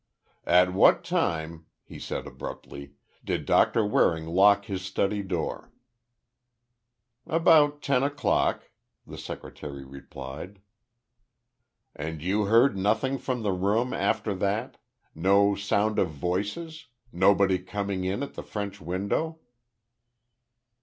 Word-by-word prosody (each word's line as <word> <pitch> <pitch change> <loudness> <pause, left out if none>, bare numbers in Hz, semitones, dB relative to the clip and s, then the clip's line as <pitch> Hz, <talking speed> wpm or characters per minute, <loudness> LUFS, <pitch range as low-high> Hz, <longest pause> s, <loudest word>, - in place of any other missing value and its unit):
"At 90 +1 +4
what 95 - +5
time," 80 0 -2 0.2
he - - -11
said, - - -5
abruptly, 70 0 -9 0.3
"did - - -2
Doctor 115 - +3
Waring 80 -5 +2
lock 100 +4 +4
his 95 -4 -4
study 100 +2 -1
door?" 90 -4 -4 1.6
"About 155 -3 +4
ten 135 -2 +2
o'clock," 145 +1 0 0.3
the - - -10
secretary 70 -2 -8
replied. 70 +7 -9 1.4
"And 80 +1 -5
you 100 +6 0
heard 115 +4 +4
nothing 110 +8 0
from 125 -2 -3
the 100 - +1
room 105 +7 0
after 110 -2 0
that? 100 +5 -2 0.4
No 100 +4 +3
sound 100 +1 0
of 90 - +2
voices? 105 - -4 0.2
Nobody 95 0 +3
coming 100 0 -4
in 95 +8 -2
at 140 - -7
the - - -6
French 100 -1 -6
window?" 100 - -2
100 Hz, 110 wpm, -27 LUFS, 90-110 Hz, 1.6 s, what